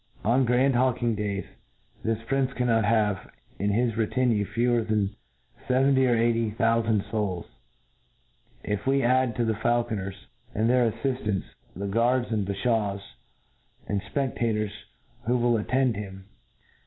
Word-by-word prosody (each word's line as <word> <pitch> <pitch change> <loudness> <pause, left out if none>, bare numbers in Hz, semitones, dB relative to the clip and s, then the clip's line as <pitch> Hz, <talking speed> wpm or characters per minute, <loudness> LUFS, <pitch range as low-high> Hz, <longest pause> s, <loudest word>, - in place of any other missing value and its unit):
On 125 +4 +3
grand 125 +3 +3
hawldng 120 -2 +1
days, 100 -2 -2 0.6
this 115 0 0
prince 135 +2 0
cannot 115 -4 +2
have 105 -3 +1 0.3
in 100 - +1
his 115 +2 +1
retinue 115 -1 +1
fewer 120 +2 +1
than 105 -2 0 0.5
feventy 130 +1 +3
or 120 - +4
eighty 115 -1 +1
tboufand, 115 -2 +1
fouls, 100 -5 -2 1.2
if 105 +3 -3
we 135 0 +3
add 130 -1 +2
to 120 - 0
the 110 - +1
faulconers 105 -4 -1 0.3
and 110 +1 +2
their 120 -2 +3
aiTiftants, 110 -5 -2 0.3
the 100 +3 -4
guards, 120 +4 +1
and 105 -3 0
bafhaws, 100 -1 0 0.9
and 100 -1 -1
fpec 130 +7 -3
tator§ 110 -3 0 0.6
who 125 +1 +3
will 120 0 +2
attend 125 +2 +1
him. 95 -2 -7
115 Hz, 135 wpm, -26 LUFS, 105-125 Hz, 1.2 s, or